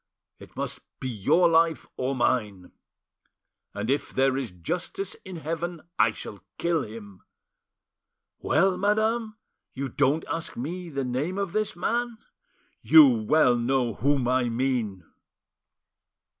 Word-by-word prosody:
It - - -14
must - - -4 0.2
be 130 - -4
your 145 - +3
life, 165 -1 +2
or 130 +2 -1
mine!' 105 -7 -1 1.0
And 105 +1 -3
if, 140 +3 -1
there 135 0 +2
is 135 -3 -2
justice 175 - -5
in 190 -1 -8
heaven, 165 +2 -4 0.2
I 110 +1 +6
shall 105 -1 -8
kill 170 -2 +1
him! 105 -5 -10 1.2
Well, 185 +4 +2
madame, 215 +2 +1 0.4
you 135 0 -3
don't 145 +4 +1
ask 165 0 -4
me 170 +8 -5
the 140 -3 -3
name 140 +10 -2
of 200 -3 -2
this 215 -3 -1
man! 235 +5 -1 0.6
You 310 -4 +8
well 160 - +3
know 120 0 0
whom 135 +3 +1
I 125 -1 +2
mean!" 115 -6 -1
140 Hz, 130 wpm, -26 LUFS, 120-175 Hz, 1.2 s, You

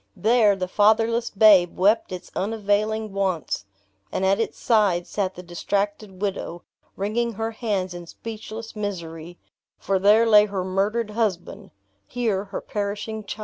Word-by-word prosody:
There, 220 -2 +4
the 185 -1 -3
fatherless 225 +4 +2
babe 195 -4 +5
wept 205 +4 +3
its 180 -1 -7
unavailing 215 +1 -1
wants, 185 - -2 0.5
and 190 - -1
at 195 +2 +3
its 225 - -2
side 205 -7 +2
sat 190 -2 -2
the 180 - -9
distracted 200 +2 -3
widow, 175 -3 -3 0.3
wringing 230 +4 -1
her 225 +2 -3
hands 205 -5 -2
in 175 -1 -9
speechless 225 +2 -8
misery; 175 -5 -6 0.4
for 195 -1 0
there 210 +4 +5
lay 210 -2 +6
her 195 -2 -3
murdered 205 +4 -1
husband 210 -6 -2 0.4
here, 220 -5 -1
her 195 -1 -6
perishing 210 +1 -4
child! 205 - -6
205 Hz, 145 wpm, -24 LUFS, 190-220 Hz, 0.5 s, lay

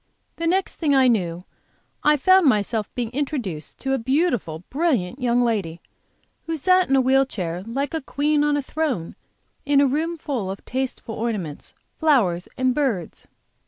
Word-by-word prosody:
The 330 - -1
next 375 +3 0
thing 295 -4 +2
I 265 -1 +5
knew 180 -7 0 0.6
I 300 0 +5
found 370 +3 +5
myself 215 -1 0
being 235 -2 -2
introduced 245 - -4
to 270 0 -1
a 270 - +1
beautiful, 245 - 0
brilliant 270 - 0
young 245 0 +2
lady, 195 -8 -1 0.7
who 325 -1 -2
sat 370 +3 +3
in 270 - +4
a 265 - +5
wheel 265 +1 +4
chair 180 -9 -4
like 275 +5 -2
a 320 - -2
queen 295 +2 +1
on 295 0 +2
a 285 - -2
throne 265 - -2 0.5
in 285 -1 +3
a 285 - +5
room 315 +5 -1
full 260 -11 -3
of 195 - -7
tasteful 255 -3 -3
ornaments, 210 -10 -4 0.2
flowers 220 - +2
and 255 0 +2
birds. 245 - -2
260 Hz, 165 wpm, -23 LUFS, 210-295 Hz, 0.7 s, I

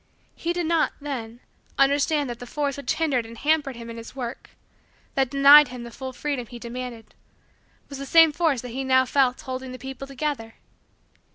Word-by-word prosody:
He 340 - -3
did 350 -1 -1
not, 330 -1 +1
then, 245 -5 -6 0.4
understand 285 +1 +2
that 240 -1 -6
the 245 - -9
force 285 +1 -2
which 280 - -2
hindered 285 -7 +1
and 230 +1 -11
hampered 290 -1 +1
him 230 0 -9
in 230 0 -8
his 230 +2 -10
work 245 -2 -6 0.6
that 270 -2 +1
denied 280 +2 +8
him 250 -1 -8
the 235 - -9
full 260 +2 -7
freedom 260 -2 -4
he 240 - -9
demanded 235 -1 -7 0.7
was 280 -1 -8
the 275 - -6
same 325 +2 +7
force 300 -5 +1
that 250 - -8
he 260 +3 -4
now 260 0 +4
felt 260 -1 +2
holding 260 0 -6
the - - -7
people 265 +1 -8
together. 270 -5 -4
265 Hz, 190 wpm, -24 LUFS, 245-285 Hz, 0.7 s, denied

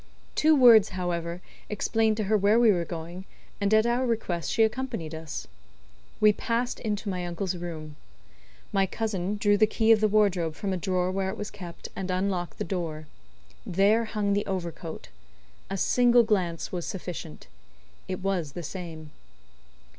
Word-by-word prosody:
Two 315 0 +4
words, 235 -6 +7
however, 175 -1 -3 0.3
explained 220 +1 +1
to 215 - 0
her 210 +2 +2
where 210 +2 +4
we 235 -2 +6
were 175 -3 +1
going, 170 +3 -7 0.4
and 200 0 +1
at 220 +1 +5
our 240 +2 +1
request 215 -9 -1
she 225 - +3
accompanied 220 -8 -2
us. 160 - -6 0.7
We 210 0 +6
passed 240 +3 -2
into 210 -1 -3
my 180 -2 -2
uncle's 175 +1 -3
room. 160 -4 -7 0.8
My 195 -1 +3
cousin 210 -2 -2
drew 205 -1 +3
the 215 +1 +5
key 220 +1 +2
of 220 -1 +6
the 215 - +5
wardrobe 195 -6 +2
from 195 +2 -2
a - - 0
drawer 185 0 0
where 190 0 -1
it - - -5
was 210 - -5
kept, 180 -5 -9
and 190 -1 -4
unlocked 185 -1 -1
the - - -2
door. 165 -4 -4 0.6
There 205 +5 +3
hung 210 -2 -1
the 205 +1 0
overcoat. 170 -4 -5 0.6
A 195 - -2
single 245 +4 +4
glance 185 -7 -1
was 175 -2 -4
sufficient. 175 -4 -6 0.6
It 185 0 -4
was 180 -7 -1
the 175 - -6
same. 160 -3 -7
195 Hz, 165 wpm, -27 LUFS, 175-215 Hz, 0.8 s, words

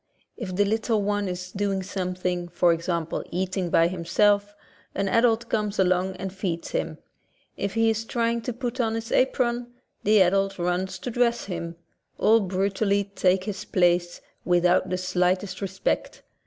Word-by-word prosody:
If 190 -6 -5
the 205 +2 +3
little 220 0 0
one 205 0 0
is 180 0 -5
doing 195 -1 -1
something, 180 -2 -3
for 175 0 +3
example 165 -1 -2
eating 185 0 -2
by 165 0 +4
himself, 200 +4 +1 0.4
an 195 0 0
adult 230 +2 +2
comes 210 -2 -1
along 185 0 +2
and 190 0 -5
feeds 180 -4 -3
him; - - -2 0.6
if 200 +1 -3
he 225 0 +3
is 220 0 -2
trying 235 0 -1
to 250 - -3
put 245 +1 -4
on 225 -1 0
his 225 +1 -5
apron, 245 -2 +1 0.4
the 210 -1 +6
adult 195 +2 +1
runs 180 +1 -1
to 245 - -5
dress 235 0 +1
him; 170 -3 -5 0.4
all 225 +1 +5
brutally 200 +1 0
take 185 -1 +2
his 200 -1 -5
place, 175 -1 +1 0.2
without 180 +1 +3
the 185 - -1
slightest 185 +1 0
respect. 190 0 -2
190 Hz, 155 wpm, -25 LUFS, 180-215 Hz, 0.6 s, the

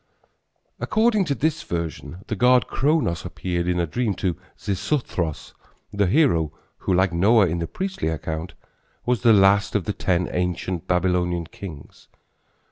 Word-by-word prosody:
According 220 -2 +2
to 140 -4 -1
this 155 +2 0
version 85 - -5
the 110 - -3
god 125 +4 +4
Kronos 140 - 0
appeared 90 -1 -3
in 90 0 +1
a 85 - +2
dream 105 +4 -1
to 90 -4 -1 0.2
Xisuthros, 95 - -2 0.4
the 100 -1 +2
hero, 90 - +3 0.3
who, - - -2
like 95 0 +2
Noah 100 +5 +5
in 85 0 -1
the 85 - -2
priestly 190 - -3
account, 80 +2 -4 0.5
was 125 -4 +1
the 115 - +5
last 100 0 +4
of 105 - +2
the 105 - -1
ten 90 -2 0
ancient 90 -1 -2
Babylonian 90 -1 +1
kings. 80 -4 -11
95 Hz, 145 wpm, -23 LUFS, 85-120 Hz, 0.5 s, Noah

